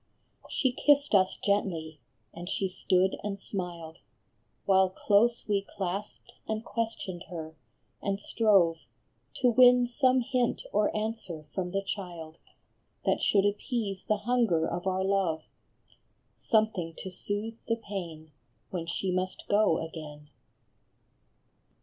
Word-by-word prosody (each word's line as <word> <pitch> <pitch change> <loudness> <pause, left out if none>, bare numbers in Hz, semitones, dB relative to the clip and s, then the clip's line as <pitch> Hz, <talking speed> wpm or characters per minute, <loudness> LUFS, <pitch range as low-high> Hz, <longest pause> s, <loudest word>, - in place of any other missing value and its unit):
She 260 - +1
kissed 285 +2 +3
us 190 -2 +4
gently, 165 -6 -1 0.3
and 175 +2 -7
she 195 - 0
stood 185 0 +1
and 200 -1 -3
smiled, 175 -5 -5 0.7
While 190 -1 +5
close 215 +5 +2
we 205 -2 +2
clasped 195 +1 -5 0.2
and 220 +1 -3
questioned 220 -6 -3
her, 160 -3 -7 0.5
and 200 -1 -1
strove 195 -7 +3 0.6
To 250 - +3
win 250 0 +7
some 255 +1 +3
hint 250 -1 0
or 210 0 +3
answer 215 -8 -4
from 180 -2 -2
the 195 +2 -1
child 175 -5 -6 0.7
That - - +2
should 200 -1 +3
appease 205 -1 -2
the 215 - +1
hunger 230 -10 +2
of 175 +2 -3
our 190 0 +1
love, 190 -5 +1 0.9
Something 210 -7 0
to 190 - -6
soothe 205 +4 -4
the 230 - +2
pain 170 -8 -7 0.4
when 170 -3 -4
she 185 +2 -1
must 185 +1 -2
go 205 -6 +3
again. 150 -2 -10
195 Hz, 125 wpm, -29 LUFS, 175-220 Hz, 0.9 s, win